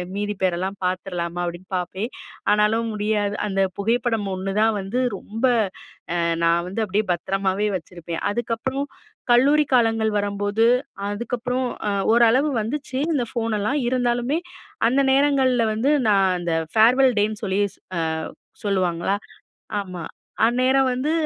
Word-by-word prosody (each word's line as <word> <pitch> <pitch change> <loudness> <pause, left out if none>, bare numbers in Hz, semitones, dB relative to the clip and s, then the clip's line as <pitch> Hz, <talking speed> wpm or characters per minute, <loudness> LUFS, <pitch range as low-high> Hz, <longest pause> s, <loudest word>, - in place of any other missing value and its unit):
மீதி 205 0 -2
பேரெல்லாம் 185 +1 0
பாத்துறலாமா?" 180 -2 -2
அப்டின்னு 175 +2 -7
பாப்பேன். 185 +5 -3 0.4
ஆனாலும் 220 +2 +2
முடியாது. 210 -1 0
அந்த 195 -1 0 0.2
புகைப்படம் 225 0 0
1 190 +1 -3
தான் 225 0 +3
வந்து 225 +7 -2 0.2
ரொம்ப 225 +4 -8 0.7
அ, - - +1 0.2
நான் 170 +1 +2
வந்து 195 +5 -4
அப்டியே 210 +1 0
பத்திரமாவே 195 +3 0
வச்சிருப்பேன். 170 -2 -6
அதுக்கப்புறம் 240 +5 -2 0.5
கல்லூரி 280 +5 +5
காலங்கள் 225 -2 +3
வரம்போது, 205 +2 0 0.4
அதுக்கப்புறம் 245 +4 -2 0.2
அ - - 0 0.2
ஓரளவு 240 +5 +4
வந்துச்சு. 260 +3 -4 0.2
இந்த 270 -5 +1
ஃபோனெல்லாம் 225 +3 -1
இருந்தாலுமே, 245 +3 +1 0.5
அந்த 275 +3 +3
நேரங்கள்ல 265 -4 +3
வந்து 235 +6 +1 0.2
நான் 195 -2 +4
அந்த 170 -1 -2 0.2
ஃபேர்வெல் 250 +4 +5
டேன்னு 210 +1 0
சொல்லி, 195 0 0 0.4
அ - - 0 0.6
சொல்லுவாங்களா. 185 -1 +1 0.7
ஆமா. 180 -3 -7 0.4
அந்நேரம் 260 +3 +3
வந்து 275 +5 -1
215 Hz, 120 wpm, -23 LUFS, 195-245 Hz, 0.7 s, கல்லூரி